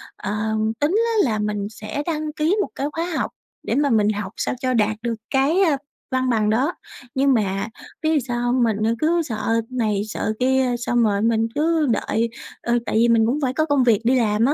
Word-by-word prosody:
ờ, 215 +2 -2 0.2
tính 295 +2 +2 0.3
á 400 - +3
là 215 - -1
mình 210 -1 -2
sẽ 215 +6 -5
đăng 310 -2 -2
ký 310 +6 +1
một - - -2
cái 280 - -2
khóa 330 +1 -2
học - - -1 0.4
để - - +1
mà 285 0 +2
mình 215 -4 +3
học 205 -2 -3
sao - - -1
cho 255 -1 0
đạt 215 -2 +2
được 235 -1 -1 0.2
cái, 280 +8 +2
ơ, 320 -7 +3 0.3
văn 260 0 +1
bằng 215 -3 +2
đó, 260 +10 +1 0.4
nhưng 275 +1 +3
mà 195 -3 0 0.4
biết 315 - +2
vì 305 - +3
sao 245 -2 -3
hông? 245 +1 +2
Mình, 220 -3 +1
ờ, 225 - +2
cứ 335 +4 +2
sợ 230 -5 -1
này 220 -6 0
sợ 215 0 -2
kia 260 -1 +2
xong 240 0 +1
rồi 205 -2 +1
mình 225 0 +2
cứ 315 +1 +2
đợi. 225 +1 0 0.3
Ờ, 240 0 +1
tại - - -2
vì 230 +2 +4
mình 230 -1 +4
cũng 255 +6 0
phải 260 -2 0
có 310 +3 +1
công 285 -4 +2
việc 230 -4 +3
đi 250 +3 +3
làm 215 -1 +2
á, 280 - +3
240 Hz, 225 wpm, -22 LUFS, 220-280 Hz, 0.4 s, vì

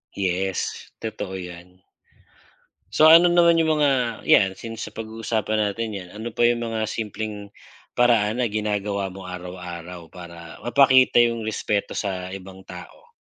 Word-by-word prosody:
Yes, 95 -1 -2
totoo 105 -3 -5
yan. 90 0 -10 1.1
So 155 +10 +6
ano 170 +2 +8
naman 170 -1 +4
yung 160 -1 +2
mga 130 -5 +1
yan, 95 -2 +4
since 115 +2 -7
napag-uusapan 110 -1 -3
natin 110 +2 -1
yan, 95 -3 -7
ano 110 +2 -6
pa 120 +2 +3
yung 120 0 0
mga 110 -1 -2
simpleng 105 -2 -5 0.4
paraan 120 -2 +2
na 125 - +2
ginagawa 105 -2 -2
mo 95 -1 -10
araw-araw 90 -1 -8
para 85 -1 -11
mapakita 130 0 +5
yung 115 -1 +2
respeto 105 -1 -2
sa 95 -2 -4
ibang 95 0 -10
tao? 90 -1 -12
105 Hz, 135 wpm, -23 LUFS, 95-115 Hz, 1.1 s, ano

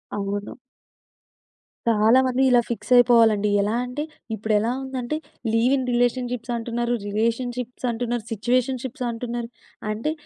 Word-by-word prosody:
అవును. 205 0 -3 1.4
చాలా 225 +3 +5
మంది 255 0 +1
ఇలా 245 -1 +6
ఫిక్సయిపోవాలండి. 230 -3 +4
ఎలా 205 +2 0
అంటే, 250 +4 -4 0.3
ఇప్పుడెలా 215 +1 +1
ఉందంటే, 260 +1 -3 0.4
లీవ్ 235 +4 +3
ఇన్ 260 - -2
రిలేషన్‌షిప్సంటున్నారు, 240 -1 -1
రిలేషన్‌షిప్సటున్నారు, 240 +1 -2
సిచ్యువేషన్‌షిప్సంటున్నారు. 240 0 -2 0.4
అంటే, 225 +8 -2
240 Hz, 90 wpm, -23 LUFS, 225-250 Hz, 1.4 s, ఇలా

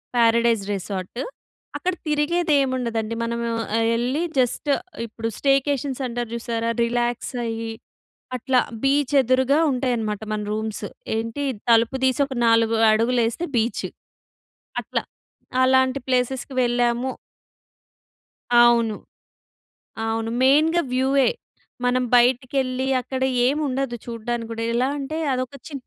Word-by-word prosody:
Paradise 230 -2 +3
resort. 190 +3 -5 0.6
అక్కడ 365 0 -1
తిరిగేది 305 +2 +1
ఏముండదండి. 235 -4 -1
మనము 235 0 -2 0.3
ఆహ్, 225 0 +2
ఎళ్ళి 255 +8 0 0.2
జస్ట్ 255 +4 0 0.4
ఇప్పుడు 225 +1 -5
స్టేకేషన్స్ 275 -1 +1
అంటారు 240 -1 -4
చూసారా, 230 -1 -2 0.2
రిలాక్స్ 240 +1 -1
అయ్యి 225 0 -3 0.6
అట్లా 255 +1 +2 0.2
బీచ్ 280 +1 +2
ఎదురుగా 260 +3 +2
ఉంటాయన్నమాట 235 -5 -1
మన 215 - -1
రూమ్స్. 215 0 -3 0.3
ఏంటి 230 +5 -3 0.3
తలుపు 230 +3 +4
తీసి 260 +1 +2
ఒక 270 -1 -7
4 230 0 +4 0.2
అడుగులు 235 +3 +2
ఏస్తే 330 +9 -3
బీచ్, 230 +1 0 1.0
అట్లా. - - -2 0.6
అలాంటి 260 +1 +3
ప్లేసెస్‍కి 255 +1 0
వెళ్ళాము. 240 +1 +1 1.5
అవును. 235 -2 +5 1.1
అవును. 225 0 -1
మెయిన్‌గా 310 +6 +4
వ్యూయే. 265 +1 +3 0.6
మనం 250 +1 +2
బయటికెళ్ళి 255 +1 +2
అక్కడ 260 +1 -5 0.3
ఏముండదు 270 -3 -1
చూడ్డానికి 230 0 -4
కూడా. 230 0 -3
ఎలా 250 +2 +2
అంటే 285 +3 -4 0.2
అదొక 255 +1 -3
చి 305 - -11
245 Hz, 110 wpm, -23 LUFS, 230-265 Hz, 1.5 s, అవును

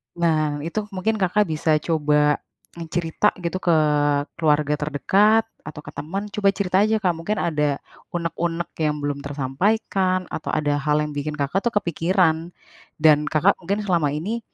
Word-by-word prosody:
Nah, 155 -4 0
itu 205 +6 -3
mungkin 215 +4 0
Kakak 195 +2 +2
bisa 155 -2 0
coba, 150 -2 +2 0.4
mencerita 170 +4 0
gitu 175 +1 -3
ke 175 - +3 0.6
keluarga 150 -2 +2
terdekat 195 +10 +2 0.2
atau 150 0 -8
ke - - -10
teman, 175 +8 -4
coba 200 -1 +2
cerita 190 0 +2
aja 220 0 +2
Kak, 180 - +3
mungkin 175 +6 -3
ada 150 -3 0 0.4
unek-unek 170 0 -2 0.2
yang 150 -1 0
belum 145 -1 -2
tersampaikan, 185 - 0
atau - - -4
ada 145 -1 +1
hal 150 +1 +1
yang 150 - -4
bikin 150 +1 -3
Kakak 145 +8 0
tuh - - +1
kepikiran. 170 -1 +1 0.4
Dan 150 -1 +4
Kakak 170 +7 +3
mungkin 195 +4 -2
selama 170 -7 +1
ini, 205 +10 -3
165 Hz, 155 wpm, -22 LUFS, 150-190 Hz, 0.6 s, Dan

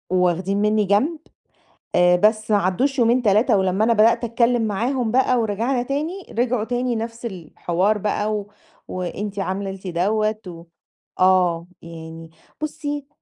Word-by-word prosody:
واخدين 185 +3 +1
منِّي 210 0 +2
جنب، 270 - +1 0.8
آآ، 180 0 +5
بس 215 +3 +2
ما 210 - +5
عدُّوش 245 +9 0
يومين، 240 +1 +3
3، 215 +2 +3
ولمّا 190 +2 +1
أنا 230 - +3
بدأت 225 +2 +4
أتكلَّم 235 +1 +1
معاهُم 235 +3 -1
بقى 255 0 +2
ورجَعنا 230 +4 0
تاني، 310 +9 -3 0.2
رجعوا 240 -3 +1
تاني 245 0 -1
نفس 230 +1 -6
الحوار 185 +2 -1
بقى، 210 +1 -1
و 205 0 -6 0.4
وأنتِ 195 +3 -5
عملتِ 195 0 -4
دوَّة، 215 +5 0
و 170 -1 -10 0.6
آه، 180 -2 +3 0.2
يعني 165 -1 -10 0.3
بُصي 290 -2 -4
215 Hz, 135 wpm, -22 LUFS, 185-240 Hz, 0.8 s, آآ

